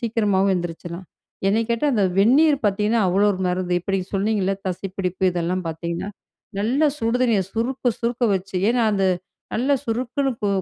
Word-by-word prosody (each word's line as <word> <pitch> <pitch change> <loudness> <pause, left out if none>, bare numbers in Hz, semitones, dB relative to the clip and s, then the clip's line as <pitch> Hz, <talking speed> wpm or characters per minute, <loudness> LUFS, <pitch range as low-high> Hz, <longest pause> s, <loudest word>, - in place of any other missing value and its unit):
சீக்கிரமாவும் 210 -4 +1
எந்திரிச்சிரலாம். 175 +1 -6 0.4
என்னைய 225 +3 +2
கேட்டா 235 +6 +1
அந்த 205 -3 +2
வெந்நீர் 280 +8 +5
பார்த்தீங்கன்னா, 210 +3 +1
அவ்வளவு 200 +3 +3
1 185 - -5
மருந்து. 180 0 0
இப்ப 195 - -4
நீங்க 185 -1 -1
சொன்னீங்களே 195 -1 +1
தசைப்பிடிப்பு 185 0 -4
இதெல்லாம் 180 +1 -1
பார்த்தீங்கன்னா, 170 +4 -4 0.5
நல்லா 260 +9 +2
சுடு 230 0 0
தண்ணிய 230 -5 +3
சுறுக்கு 245 +3 -1
சுறுக்குன்னு 235 -3 +1
வச்சு 190 0 -6
ஏன்னா 240 0 +2
அது 195 -1 +1 0.5
நல்லா 265 +5 +2
சுறுக்குன்னு 255 +4 -1
கு 205 - +1
205 Hz, 155 wpm, -22 LUFS, 185-235 Hz, 0.5 s, வெந்நீர்